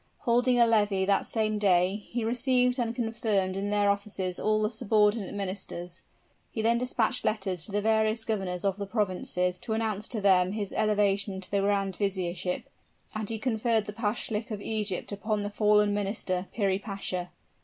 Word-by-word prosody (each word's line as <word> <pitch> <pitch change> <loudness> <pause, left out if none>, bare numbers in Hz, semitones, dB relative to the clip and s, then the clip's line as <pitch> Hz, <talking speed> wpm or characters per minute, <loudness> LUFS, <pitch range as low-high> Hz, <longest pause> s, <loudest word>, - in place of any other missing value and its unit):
Holding 245 0 +3
a 235 - +7
levee 205 -4 +2
that 200 0 +2
same 215 -2 0
day, 185 -1 +3
he 240 -1 -2
received 250 +1 +2
and 235 -1 -1
confirmed 220 -5 0
in 200 +1 -2
their 205 0 +2
offices 200 -3 -3
all 215 0 +1
the 215 - 0
subordinate 215 -2 +1
ministers; 185 -3 -5 0.5
he 220 - -3
then 235 +1 +3
dispatched 245 -2 +1
letters 190 -6 0
to - - -9
the 205 +1 0
various 220 0 +2
governors 190 -4 -2
of 195 +1 0
provinces 180 -4 -1
to 220 - -4
announce 220 -2 -1
to 230 - -3
them 190 -2 +3
his 205 -2 -3
elevation 205 -2 +1
to 190 - -6
the 200 - +2
grand 195 -1 0
viziership; 185 -3 -1 0.5
and 215 -1 -3
he 225 - -1
conferred 225 -1 +1
the 210 - -6
Pashalic 220 0 -2
of 215 -3 -4
Egypt 210 -3 -2
upon 205 +1 -2
the 205 - -4
fallen 210 -1 +3
minister, 195 -2 -2
Piri 195 -3 0
Pasha. 195 -3 -3
205 Hz, 170 wpm, -28 LUFS, 195-220 Hz, 0.5 s, a